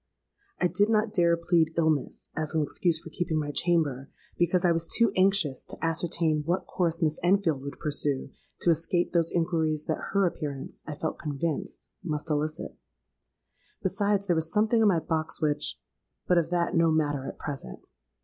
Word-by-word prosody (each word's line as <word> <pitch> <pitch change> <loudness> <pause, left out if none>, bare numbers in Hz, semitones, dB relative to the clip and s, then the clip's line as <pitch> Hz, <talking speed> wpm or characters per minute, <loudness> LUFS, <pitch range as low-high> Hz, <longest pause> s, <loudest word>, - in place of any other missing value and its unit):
I - - +2
did 185 +5 +2
not 215 -1 +2
dare 170 -3 +3
plead 165 -1 +1
illness, 155 -4 0
as 155 0 -2
an 155 - +3
excuse 165 +3 +1
for 165 - -11
keeping 175 -2 -1
my 145 -1 -2
chamber; 145 -5 0 0.3
because 175 +1 +2
I 175 - +5
was 165 0 0
too 230 -3 +3
anxious 185 -8 +2
to - - -9
ascertain 165 -1 +1
what 175 +4 -1
course 170 -1 0
Miss 155 -1 +1
Enfield 175 -6 +2
would 140 +1 -7
pursue 145 -2 -1 0.3
to 170 - +4
escape 165 +2 0
those 170 -1 +2
inquiries 160 -3 0
that - - -2
her 200 -1 +4
appearance, 145 -6 -4
I 150 - -4
felt 160 +2 -4
convinced, 150 0 -3
must 155 -1 -3
elicit. 155 +2 -2 1.1
Besides, 200 +1 +1
there 175 - +2
was 160 0 0
something 220 +3 +3
in 220 - +5
my 190 -4 +4
box 160 -1 -2
which—but 150 +3 -2
of 165 -2 +2
that 175 -1 0
no 165 0 +4
matter 145 -3 +1
at - - -7
present. 135 - -6
165 Hz, 170 wpm, -28 LUFS, 150-175 Hz, 1.1 s, I